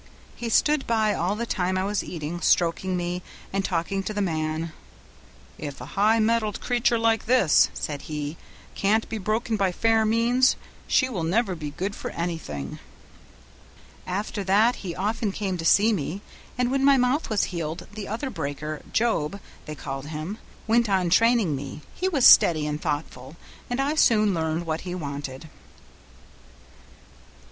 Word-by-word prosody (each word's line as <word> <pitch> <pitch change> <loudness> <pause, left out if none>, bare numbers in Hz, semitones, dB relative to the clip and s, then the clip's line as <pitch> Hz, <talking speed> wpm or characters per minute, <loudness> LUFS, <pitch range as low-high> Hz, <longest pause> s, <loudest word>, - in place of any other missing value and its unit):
He 235 - -4
stood 295 +5 +2
by 220 -2 +2
all 180 +3 -1
the 235 +2 -3
time 185 -4 -1
I 185 - 0
was 205 +1 -1
eating, 170 +1 -5
stroking 180 +2 +2
me 175 +1 -3 0.3
and 195 0 0
talking 185 +2 -1
to 210 +2 -5
the - - -1
man. 160 -3 -2 0.9
'If 145 -2 -6
a 125 - -7
high 215 +3 +4
mettled 220 -1 +1
creature 240 -1 +1
like 225 -1 +1
this,' 235 - +5
said 145 -2 -4
he, 150 0 -5 0.4
'can't 215 +3 +1
be 220 - -3
broken 220 +3 -1
by 195 -2 +1
fair 225 +4 +2
means, 235 +4 +3 0.3
she 270 -4 +3
will 215 -9 -4
never 190 +4 +1
be 155 -4 -5
good 190 +7 -4
for - - -5
anything.' 115 - -5 1.3
"After 200 +2 -3
that 210 +6 +3
he 175 -4 -6
often 210 +2 -1
came 195 -2 -3
to 165 - -4
see 215 +6 +5
me, 190 +3 -3 0.3
and 250 0 +1
when 270 0 +1
my 280 0 +6
mouth 255 +5 +1
was 215 -3 +1
healed 170 +1 -4
the 210 -2 -6
other 245 +6 -3
breaker, 155 -1 -4
Job, 200 -6 0 0.3
they 155 - -5
called 135 -1 -6
him, 160 +7 -5 0.3
went 230 0 +2
on 185 -3 +1
training 230 -6 +4
me; 140 +2 -7
he 375 - -1
was 285 -9 +2
steady 155 -3 +7
and 150 0 -3
thoughtful, 145 -2 -4 0.3
and 245 +1 -2
I 280 +2 +1
soon 215 -9 +4
learned 160 0 -1
what 160 0 -2
he 180 -1 -5
wanted." 140 -2 -6
195 Hz, 165 wpm, -25 LUFS, 160-225 Hz, 1.3 s, steady